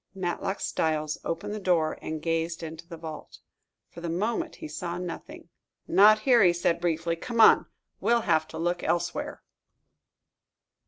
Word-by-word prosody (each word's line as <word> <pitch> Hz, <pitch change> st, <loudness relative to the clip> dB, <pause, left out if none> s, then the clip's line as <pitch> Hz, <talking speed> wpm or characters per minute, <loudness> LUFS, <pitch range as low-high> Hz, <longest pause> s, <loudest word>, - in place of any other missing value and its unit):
Matlock 190 Hz, +1 st, -3 dB
Styles 155 Hz, -1 st, -1 dB
opened 165 Hz, +5 st, -3 dB
the 215 Hz, -, -4 dB
door 170 Hz, -5 st, +1 dB
and 155 Hz, -1 st, -5 dB
gazed 165 Hz, 0 st, -1 dB
into 165 Hz, +1 st, -8 dB
the 170 Hz, -2 st, -8 dB
vault. 160 Hz, -1 st, -9 dB, 0.5 s
For 170 Hz, -, -10 dB
the 170 Hz, -, -4 dB
moment 230 Hz, -, -2 dB
he 320 Hz, -, -8 dB
saw 175 Hz, -, -5 dB
nothing. 180 Hz, -1 st, -7 dB, 0.4 s
"Not 210 Hz, +4 st, +6 dB
here," 245 Hz, -1 st, +5 dB
he 180 Hz, -3 st, +6 dB
said 170 Hz, -1 st, 0 dB
briefly. 165 Hz, -1 st, 0 dB
"Come 230 Hz, +8 st, -5 dB
on; 220 Hz, -, +7 dB, 0.3 s
we'll 235 Hz, 0 st, +2 dB
have 155 Hz, -6 st, +1 dB
to 160 Hz, -, -9 dB
look 175 Hz, +2 st, -1 dB
elsewhere." 175 Hz, -, -2 dB
175 Hz, 155 wpm, -27 LUFS, 165-205 Hz, 0.5 s, on